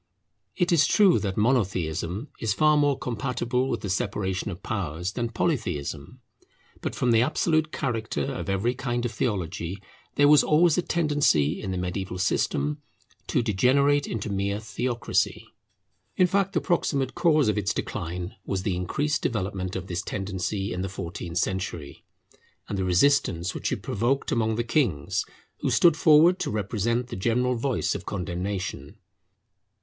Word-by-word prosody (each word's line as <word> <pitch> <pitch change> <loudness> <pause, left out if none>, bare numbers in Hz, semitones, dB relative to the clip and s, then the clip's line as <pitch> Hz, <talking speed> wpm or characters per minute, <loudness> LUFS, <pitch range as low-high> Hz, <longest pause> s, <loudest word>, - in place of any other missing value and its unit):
It 175 -1 +1
is 165 -3 +5
true 200 -5 +5
that 95 -3 -3
Monotheism 95 - 0
is 105 -3 0
far 155 0 +4
more 145 -2 +3
compatible 125 +2 -2
with - - -2
the 100 - -4
separation 95 -1 -2
of 90 -2 -8
powers 90 -3 -3
than 120 +2 -2
Polytheism. 110 - -2 0.6
But - - -3
from 125 - +1
the 115 -1 +5
absolute 155 +3 +1
character 115 -5 -2
of 135 -6 -4
every 100 +5 +1
kind 120 -2 -2
of 120 - -1
theology, 95 -5 -2 0.4
there 145 - +5
was 150 -2 +7
always 160 +1 +4
a - - +2
tendency 145 - +1
in 100 - -4
the 95 - -2
mediaeval 90 +1 -3
system 75 -5 0 0.5
to - - +1
degenerate 140 +7 +3
into 110 -1 -4
mere 100 +1 -1
theocracy. 115 +3 -1 0.7
In 185 - +6
fact, 195 +1 +1
the - - +1
proximate 140 -6 0
cause 155 -6 +3
of 105 - +2
its 100 -2 0
decline 90 +2 -4
was 95 -1 -3
the 95 -3 0
increased 145 - -1
development 95 -4 -2
of 95 -1 -4
this 90 -1 -3
tendency 95 0 -3
in 90 - -3
the 95 - -3
fourteenth 90 -2 -6
century, 90 -6 -3 0.6
and - - -3
the 95 - -1
resistance 90 -2 +2
which - - -3
it - - -3
provoked 120 +6 0
among 110 -1 +1
the 120 - 0
kings, 115 - 0 0.3
who - - -1
stood 170 -3 +5
forward 160 +3 +5
to - - -2
represent 110 +3 -1
the 120 - -5
general 125 +5 +1
voice 125 +2 0
of - - -7
condemnation. 95 -2 -4
110 Hz, 155 wpm, -26 LUFS, 95-135 Hz, 0.7 s, was